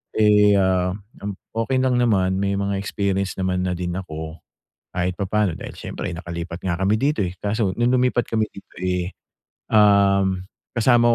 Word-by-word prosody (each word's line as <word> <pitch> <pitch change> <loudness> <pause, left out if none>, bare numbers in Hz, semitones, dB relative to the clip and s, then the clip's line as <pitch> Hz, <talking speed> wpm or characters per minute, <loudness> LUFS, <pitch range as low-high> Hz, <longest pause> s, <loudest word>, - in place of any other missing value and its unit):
Eh, 105 -1 +5
ah, 90 -1 +2 0.3
m 100 -1 -3 0.2
okey 130 +3 +1
lang 130 -1 +2
naman, 95 -6 +2
may 100 0 0
mga 100 0 -1
experience 100 -1 -1
naman 90 -1 0
na 90 - 0
din 90 0 -3
ako 80 -3 -6 0.5
kahit 90 0 -1
papaano 100 -3 0
dahil - - -7
siyempre - - -5
nakalipat 85 0 -6
nga 85 -2 -1
kami 95 +2 +2
dito, 140 -4 +1
eh. 90 - -6
Kaso 105 -2 0
nung 120 +1 +2
lumipat 125 -1 +2
kami 110 -1 +1
dito, 100 - -14
eh, 90 0 -1 0.6
um, 100 -3 +4 0.3
kasama 120 0 +4
100 Hz, 160 wpm, -22 LUFS, 90-110 Hz, 0.6 s, Eh